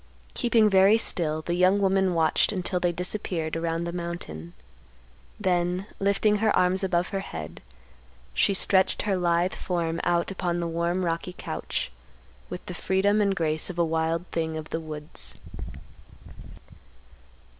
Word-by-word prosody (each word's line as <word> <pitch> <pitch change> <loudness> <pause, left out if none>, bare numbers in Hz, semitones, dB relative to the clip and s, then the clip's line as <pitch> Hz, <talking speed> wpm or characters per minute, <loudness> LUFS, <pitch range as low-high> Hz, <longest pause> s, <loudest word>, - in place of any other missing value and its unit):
Keeping 235 -3 +3
very 195 +2 +6
still 155 -8 -1
the 175 - -2
young 185 +3 +4
woman 190 -2 +2
watched 160 -1 +3
until 185 -2 -1
they 175 -1 +1
disappeared 175 -2 -2
around 165 0 -1
the 170 - -3
mountain. 170 - -6 0.9
Then, 180 -1 +1
lifting 200 +1 +2
her 220 +1 +2
arms 185 +1 +2
above 180 -1 +1
her 195 - -2
head, 80 - -7 0.7
she 200 - +2
stretched 190 0 +3
her 205 -3 +1
lithe 175 0 +1
form 170 -2 -2
out 175 +1 +1
upon 175 -2 -1
the 170 - -1
warm 170 +2 0
rocky 170 +2 -2
couch - - -4 0.6
with - - -7
the - - -6
freedom 200 +2 +2
and 200 -1 +2
grace 155 -3 0
of 180 - -6
a 170 - +3
wild 165 +1 0
thing 160 -1 -2
of 155 0 -7
the 160 - -1
woods. 155 -1 -8
175 Hz, 145 wpm, -26 LUFS, 165-190 Hz, 0.9 s, very